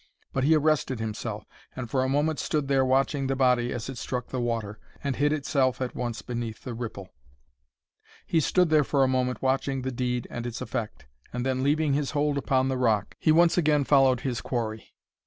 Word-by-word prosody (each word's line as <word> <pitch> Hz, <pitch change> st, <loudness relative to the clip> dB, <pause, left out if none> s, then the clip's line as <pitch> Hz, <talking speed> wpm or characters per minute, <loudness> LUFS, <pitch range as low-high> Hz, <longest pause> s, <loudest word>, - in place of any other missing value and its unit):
But 130 Hz, -, 0 dB
he 160 Hz, +2 st, +5 dB
arrested 150 Hz, -5 st, +1 dB
himself, 110 Hz, -1 st, -4 dB, 0.3 s
and 125 Hz, -2 st, -5 dB
for 130 Hz, +3 st, 0 dB
a 130 Hz, -, 0 dB
moment 145 Hz, +2 st, +1 dB
stood 150 Hz, -3 st, -1 dB
there 135 Hz, -1 st, +3 dB
watching 135 Hz, +1 st, +1 dB
the 135 Hz, -, 0 dB
body 125 Hz, -2 st, +2 dB
as 120 Hz, -2 st, -4 dB
it 135 Hz, -3 st, -6 dB
struck 125 Hz, -2 st, -4 dB
the 130 Hz, -, -2 dB
water, 115 Hz, -3 st, -2 dB, 0.2 s
and 140 Hz, -2 st, -1 dB
hid 145 Hz, +2 st, +2 dB
itself 135 Hz, -3 st, +1 dB
at 130 Hz, -1 st, -3 dB
once 120 Hz, -2 st, -4 dB
beneath 120 Hz, -3 st, -5 dB
the 125 Hz, -, -5 dB
ripple. 110 Hz, -5 st, -6 dB, 1.2 s
He 165 Hz, -, +2 dB
stood 180 Hz, +2 st, +2 dB
there 155 Hz, -1 st, +5 dB
for 140 Hz, -1 st, +2 dB
a -, -, +4 dB
moment 125 Hz, 0 st, -1 dB
watching 135 Hz, 0 st, 0 dB
the 130 Hz, -, -2 dB
deed 125 Hz, -1 st, -2 dB
and 120 Hz, 0 st, -4 dB
its 115 Hz, -1 st, -5 dB
effect, 115 Hz, -, -5 dB, 0.3 s
and 125 Hz, +1 st, -3 dB
then 130 Hz, -1 st, 0 dB
leaving 145 Hz, +1 st, +2 dB
his 145 Hz, -1 st, 0 dB
hold 145 Hz, -1 st, +1 dB
upon 130 Hz, -1 st, +1 dB
the 130 Hz, -1 st, -1 dB
rock, 110 Hz, -5 st, +1 dB
he 155 Hz, -, +3 dB
once 170 Hz, +2 st, +5 dB
again 150 Hz, -3 st, +3 dB
followed 135 Hz, -3 st, +4 dB
his 125 Hz, -3 st, -2 dB
quarry. 110 Hz, -3 st, -4 dB
130 Hz, 205 wpm, -27 LUFS, 120-140 Hz, 1.2 s, he